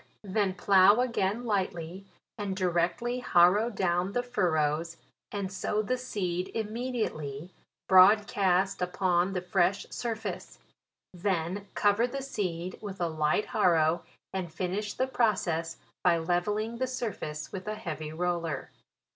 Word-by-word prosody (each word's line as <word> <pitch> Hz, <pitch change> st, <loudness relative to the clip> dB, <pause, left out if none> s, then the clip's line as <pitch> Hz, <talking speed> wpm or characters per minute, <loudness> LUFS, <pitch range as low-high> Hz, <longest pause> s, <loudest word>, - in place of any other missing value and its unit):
Then 200 Hz, -1 st, 0 dB
plough 195 Hz, +3 st, +5 dB
again 235 Hz, -2 st, -1 dB
lightly, 190 Hz, -3 st, -2 dB, 0.3 s
and 205 Hz, -3 st, -3 dB
directly 180 Hz, +7 st, 0 dB
harrow 200 Hz, +1 st, +4 dB
down 185 Hz, -2 st, 0 dB
the 245 Hz, -, 0 dB
furrows, 165 Hz, -7 st, 0 dB, 0.3 s
and 195 Hz, -2 st, -4 dB
sow 210 Hz, +2 st, -1 dB
the 255 Hz, +5 st, 0 dB
seed 185 Hz, -8 st, -3 dB
immedi 230 Hz, +2 st, -1 dB
ately, 145 Hz, +3 st, -7 dB, 0.4 s
broadcast 190 Hz, -1 st, +5 dB
upon 180 Hz, 0 st, +1 dB
the 180 Hz, -, -1 dB
fresh 185 Hz, +1 st, +1 dB
surface; 225 Hz, -2 st, -4 dB, 0.6 s
then 185 Hz, +1 st, -2 dB
cover 205 Hz, +4 st, +3 dB
the 270 Hz, +2 st, -5 dB
seed 185 Hz, -8 st, -3 dB
with 200 Hz, -2 st, -7 dB
a 175 Hz, -, +1 dB
light 155 Hz, +5 st, +1 dB
harrow, 170 Hz, -4 st, +2 dB, 0.3 s
and 185 Hz, -3 st, -3 dB
finish 195 Hz, +5 st, -3 dB
the 260 Hz, -, +1 dB
process 185 Hz, -10 st, 0 dB, 0.3 s
by 175 Hz, -2 st, +4 dB
levelling 210 Hz, +7 st, -1 dB
the 260 Hz, -, 0 dB
surface 210 Hz, -12 st, -4 dB
with 190 Hz, +1 st, -7 dB
a 215 Hz, -, -2 dB
heavy 155 Hz, -5 st, -5 dB
roller. 170 Hz, -3 st, -2 dB
190 Hz, 130 wpm, -29 LUFS, 175-215 Hz, 0.6 s, plough